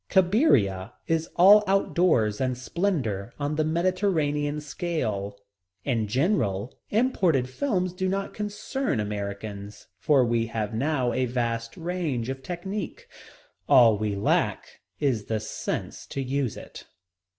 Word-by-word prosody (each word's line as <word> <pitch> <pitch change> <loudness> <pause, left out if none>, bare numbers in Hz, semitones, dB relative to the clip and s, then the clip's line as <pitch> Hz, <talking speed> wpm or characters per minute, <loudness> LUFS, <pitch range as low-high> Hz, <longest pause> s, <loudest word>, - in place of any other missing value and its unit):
Cabiria 140 - +3
is 165 0 0
all 200 +4 +8
out 195 +1 +1
doors 115 - +2
and 130 -1 0
splendor 125 - -2
on 145 +1 -1
the 155 - +1
Mediterranean 155 -4 0
scale. 120 - -3 0.5
In 115 -6 0
general, 120 - 0 0.2
imported 190 - +2
films 185 - -1
do 185 +1 -1
not 195 +1 -2
concern 210 - -2
Americans, 100 0 -5
for 135 +3 +4
we 115 -1 +1
have 110 -2 -3
now 130 0 0
a 130 0 0
vast 115 -1 -2
range 165 -9 -2
of 135 0 -4
technique. 180 +6 -5 0.6
All 115 -4 +7
we 105 -1 -2
lack 100 - 0 0.2
is 130 -8 0
the 110 -1 -1
sense - - -5
to - - -5
use 135 -3 -1
it. - - -11
135 Hz, 130 wpm, -26 LUFS, 110-180 Hz, 0.6 s, all